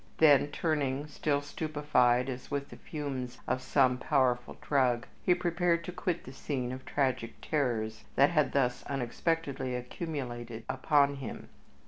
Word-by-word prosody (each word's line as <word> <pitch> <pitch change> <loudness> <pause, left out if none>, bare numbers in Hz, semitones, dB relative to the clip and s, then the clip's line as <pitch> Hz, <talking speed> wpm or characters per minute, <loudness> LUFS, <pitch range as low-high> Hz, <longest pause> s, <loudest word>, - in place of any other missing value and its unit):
Then 145 -3 +6
turning, 145 -2 -1
still 145 -1 -1
stupefied 145 -5 +2
as 130 -1 -6
with 140 -1 -3
the - - -10
fumes 135 -6 -5
of 130 0 0
some 130 -1 +3
powerful 130 -5 +1
drug, 125 -4 +2 0.2
he 180 - +4
prepared 175 -1 +1
to 180 - -5
quit 175 -1 -2
the 130 - -10
scene 130 -3 -3
of 130 0 -7
tragic 130 -5 0
terrors 115 -7 -1
that 140 +3 +5
had 150 -3 +2
thus 125 -3 +1
unexpectedly 135 0 -1
accumulated 125 -4 -5
upon 140 -1 +3
him. 135 -3 -7
135 Hz, 140 wpm, -31 LUFS, 125-150 Hz, 0.2 s, Then